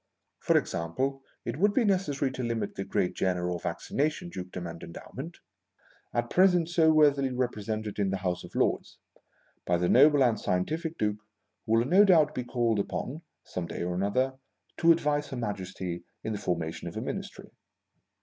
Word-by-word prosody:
For - - +3
example, 130 +12 -2 0.2
it 120 +3 -3
would 205 +4 +3
be 260 - +4
necessary 150 -9 +1
to 130 - -5
limit 115 -3 -2
the 95 - -4
gr?at 95 -2 0
Jenner 90 -1 0
or 90 - -2
Vaccination 155 - -2
Dukedom 90 - -6
and 85 -1 -7
endowment, 85 - -8 0.7
at 120 0 -2
present 180 -3 +4
so 165 -2 +4
worthily 145 -3 +4
represented 110 -4 -3
in 100 -1 +2
the 95 - -1
House 90 -1 -2
of - - -12
Lords, - - 0 0.7
by 85 - +1
the 90 +1 +1
noble 145 +4 +6
and 115 -4 +2
scientific 160 - -1
Duke 105 -1 0 0.5
who 110 - +1
will 115 +1 +4
no 185 +9 +6
doubt 160 -6 +5
be 125 - -3
called 120 -3 0
upon 130 +8 -3 0.2
(some 90 -2 -5
day - - -4
or 90 +2 -1
other) 130 +6 0 0.4
to 170 0 +6
advise 150 -3 +1
Her 130 - -6
Majesty 95 -5 -4 0.2
in 110 - -2
the 105 - -4
formation 80 -2 -3
of - - -6
a - - -2
Ministry. - - -6
120 Hz, 175 wpm, -29 LUFS, 95-150 Hz, 0.7 s, noble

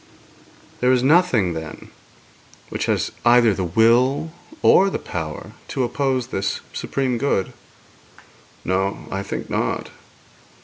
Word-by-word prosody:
'There 125 +1 +3
is 125 -1 +2
nothing, 130 - +3
then, 80 -1 -8 0.8
which - - -3
has - - 0
either 120 -2 +5
the 95 - -3
will 120 - +3 0.3
or 195 +1 +6
the - - -2
power 80 -3 -6 0.2
to 130 - -2
oppose 130 0 -1
this 95 -6 -2
supreme 130 -3 -2
good.' 120 -8 0 1.1
'No; 95 +2 -1
I 95 - -2
think - - -5
not.' - - -2
120 Hz, 120 wpm, -21 LUFS, 95-130 Hz, 1.1 s, or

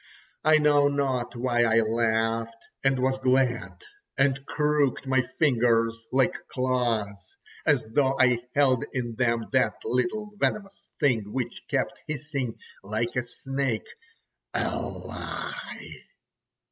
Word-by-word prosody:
I 155 0 +6
know 145 -1 +4
not 135 -4 -1
why 120 0 +1
I 115 0 +4
laughed 115 0 0 0.2
and 135 -1 +3
was 130 +1 +1
glad, 130 - +1 0.3
and 135 0 +2
crooked 150 -3 +1
my 130 0 +3 0.2
fingers 115 -5 +2
like 135 +7 +3
claws, 115 -7 -1 0.3
as - - +4
though 135 +3 +2
I 125 -2 +5 0.2
held 135 -4 +3
in 120 -3 -2
them 115 -1 +1
that 130 -2 +2
little 210 - -1
venomous 200 -1 -1 0.2
thing 115 -8 +1
which 130 0 -3
kept - - -1
hissing 140 -5 -3 0.3
like 110 +4 -2
a 125 - +2
snake: 135 -1 -3 0.7
a - - 0
lie! - - -6
130 Hz, 120 wpm, -27 LUFS, 115-140 Hz, 0.7 s, I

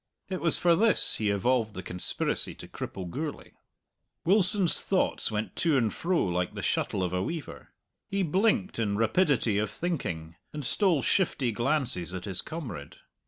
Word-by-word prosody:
It 185 -1 -3
was 165 -2 +3
for 170 -1 +4
this 225 +5 +3
he 105 -2 0
evolved 110 +2 +1
the 95 - -6
conspiracy 90 +1 -2
to - - -11
cripple 95 -2 -6
Gourlay. 150 - -5 0.7
Wilson's 190 -1 +5
thoughts 190 - 0
went 110 0 -3
to 160 -4 +2
and 115 -4 +1
fro 175 0 0
like 90 -1 -2
the - - -5
shuttle 95 - 0
of 90 -1 -2
a 90 - 0
weaver. 160 - -6 0.4
He 195 0 -1
blinked 195 - +1
in 100 -3 0
rapidity 115 - +2
of 105 -1 -1
thinking, 85 - -4 0.2
and 150 -3 -5
stole 170 - +2
shifty 140 -10 +1
glances 120 - 0
at 90 - -6
his 95 -3 -3
comrade. 125 - -7
130 Hz, 165 wpm, -28 LUFS, -, 0.7 s, Wilson's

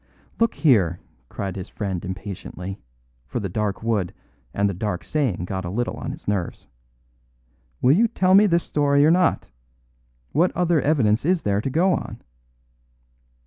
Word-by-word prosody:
"Look 230 0 +2
here," 95 - +3 0.3
cried 95 -2 -4
his 95 -2 -6
friend 95 -4 -4
impatiently, 95 0 -7 0.5
for 60 - -3
the 100 -3 -3
dark 105 +2 -2
wood 105 -6 -1 0.4
and 100 0 +1
the 100 - -1
dark 95 -1 -3
saying 125 - -1
got 95 0 -4
a 85 - -4
little 120 +6 -2
on - - -5
his - - -11
nerves; 100 -4 -2 1.2
"will 130 +4 +6
you 230 +5 +4
tell 185 -4 +2
me 205 +2 +7
this 170 -2 +2
story 145 -1 +2
or 155 - +5
not? 180 0 +2 0.8
What 170 +6 +3
other 175 -4 +2
evidence 120 -8 +2
is 175 +2 +1
there 100 0 +1
to 135 - -2
go 180 +7 +3
on?" - - -4
110 Hz, 160 wpm, -23 LUFS, 95-160 Hz, 1.2 s, me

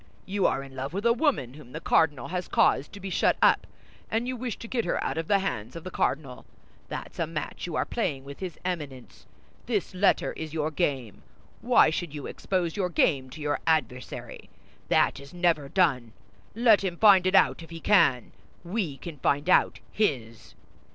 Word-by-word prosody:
You 195 0 +1
are 135 - -1
in 135 -1 -12
love 135 +4 -5
with 200 +4 -3
a 235 - +5
woman 245 - 0
whom 135 -4 -14
the 160 - -4
cardinal 145 -6 +1
has 180 0 -3
caused 145 - +2
to 200 - -9
be 195 -1 -6
shut - - +2
up, - - +4 0.4
and 230 +2 -1
you 255 - -2
wish 245 -2 -4
to 230 - -9
get 235 -1 -1
her 175 - -1
out - - -2
of 165 - -4
the 200 - +4
hands 180 - -4
of 165 - -7
the 185 - -7
cardinal. 135 -5 -2 0.4
That's - - -7
a 165 - 0
match 165 +2 -5
you 170 - -5
are - - +1
playing 150 - -2
with 140 +1 -10
his 185 -3 -6
Eminence; 145 -9 -6 0.4
this 210 -6 -1
letter 190 +2 +2
is 160 0 -7
your 155 0 -1
game. 135 - -2 0.4
Why 240 -9 +5
should 160 -2 -4
you 145 - -6
expose 180 -4 -2
your 185 -3 -1
game 140 -6 +1
to 150 +4 -10
your 145 0 -1
adversary? 145 -7 -2 0.4
That - - +2
is 140 +5 -13
never 170 -5 +1
done. 135 - +1 0.4
Let 225 -3 +5
him 180 -3 -2
find 195 -3 +6
it 185 - +2
out 195 - +4
if 165 - -11
he 165 0 -8
can! 160 - +3 0.3
We 175 -6 -3
can 160 -2 -9
find 145 +4 0
out - - +3
his!" 125 - -2
165 Hz, 200 wpm, -27 LUFS, 140-195 Hz, 0.4 s, find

